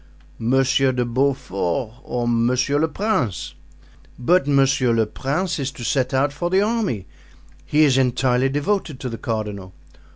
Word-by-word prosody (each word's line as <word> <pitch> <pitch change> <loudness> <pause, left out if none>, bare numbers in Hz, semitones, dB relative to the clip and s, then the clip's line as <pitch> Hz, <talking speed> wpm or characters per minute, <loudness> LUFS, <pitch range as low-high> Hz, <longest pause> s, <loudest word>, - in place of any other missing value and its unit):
Monsieur 135 +3 +2
de 125 -1 0
Beaufort 120 -3 -1
or 120 -1 -3
Monsieur 125 +4 +1
le 160 - +2
Prince." 160 - -2 0.6
"But 145 +4 +2
Monsieur 135 -3 +3
le 115 -1 +2
Prince 150 - -2
is 135 -1 -1
to 120 - -9
set 130 +1 0
out 135 +2 +1
for 175 +4 -2
the 190 +2 +3
army; 210 - -1 0.6
he 150 +1 +4
is 135 -3 +4
entirely 130 0 +2
devoted 150 0 -1
to 130 - -4
the 115 - -6
cardinal." 105 -4 -4
130 Hz, 150 wpm, -21 LUFS, 120-145 Hz, 0.6 s, he